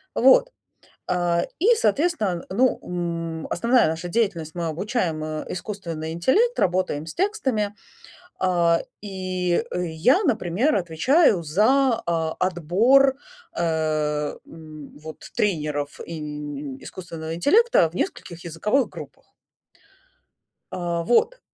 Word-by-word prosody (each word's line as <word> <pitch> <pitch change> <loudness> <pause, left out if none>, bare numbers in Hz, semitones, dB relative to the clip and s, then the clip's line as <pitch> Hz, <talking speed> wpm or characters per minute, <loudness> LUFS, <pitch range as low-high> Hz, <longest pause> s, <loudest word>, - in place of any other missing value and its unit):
Вот, 265 - +5 0.6
э, 175 -1 +1 0.2
и 450 +8 +5
соответственно, 295 - 0
ну, 250 +7 +2
м, 165 -2 -4
основная 235 -1 +3
наша 160 +2 -3
деятельность 175 -6 -1
мы 170 -1 -2
обучаем, 175 -1 -2
э, 155 0 -4
искусственный 170 -5 -5
интеллект, 400 - +2
работаем 180 -5 0
с 160 - -7
текстами, 265 - -1 0.7
э, 175 -2 +3 0.2
и 185 -3 -1
я, 180 - +2
например, 225 - +1
отвечаю 185 - +3
за, 230 - +2
э, 170 - +1 0.3
отбор, 200 - +3 0.4
э, 155 -3 -1
м, 155 -3 -12
вот, 155 0 -10
тренеров 150 -7 -1
им 150 -3 -6
искусственного 165 -3 -7
интеллекта 305 - +4
в 165 - -16
нескольких 170 -1 -4
языковых 210 - 0
группах. - - -12 1.4
Э, 170 -1 -2
вот, 470 - +2
175 Hz, 105 wpm, -23 LUFS, 160-230 Hz, 1.4 s, Вот